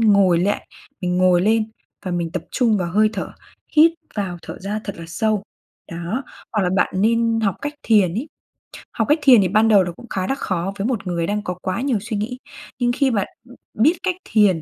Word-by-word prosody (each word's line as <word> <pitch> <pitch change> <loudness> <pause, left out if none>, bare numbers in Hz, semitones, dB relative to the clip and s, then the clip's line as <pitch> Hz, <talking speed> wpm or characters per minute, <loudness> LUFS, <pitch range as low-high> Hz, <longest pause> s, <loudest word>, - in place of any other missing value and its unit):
ngồi 200 -5 +5
lại, 200 +4 -1 0.3
mình 180 -2 -1
ngồi 180 -1 +4
lên 220 +1 +2 0.4
và - - -1
mình 170 -2 -2
tập 180 - -3
trung 235 -4 +2
vào 175 -2 -2
hơi 215 +1 +4
thở, - - -4 0.5
hít 325 +2 +7 0.2
vào 190 -4 -3
thở - - -8
ra 205 +3 -3
thật 200 - -5
là 165 - -7
sâu, 210 +4 0 0.5
đó, 175 +10 -3 0.3
hoặc 210 -3 +1
là 180 - +1
bạn - - +1
nên 230 +1 +2
học 200 -4 +1
cách 290 +1 -3
thiền 200 -6 +3
ấy. 250 +9 -3 0.6
Học - - -1
cách 305 +2 +4
thiền 255 -6 +7
thì 185 - +2
ban 215 +4 +3
đầu 205 -4 +6
là - - -5
nó 175 - -4
cũng 240 - -14
khá 185 -1 -2
là 270 - 0
khó 190 -5 -2
với 200 +4 -1
một 210 -7 -2
người 170 -1 -1
đang 210 +1 -1
có 180 - -3
quá 185 +6 -2
nhiều 265 -5 +1
suy 220 0 -4
nghĩ, 240 +5 -3 0.4
nhưng 240 0 +2
khi 265 +1 +1
bạn, 200 -4 0 0.2
ưm, 245 - -14 0.2
biết 285 +10 +4
cách 370 -1 0 0.2
thiền, 200 -7 +4
210 Hz, 230 wpm, -21 LUFS, 185-230 Hz, 0.6 s, hít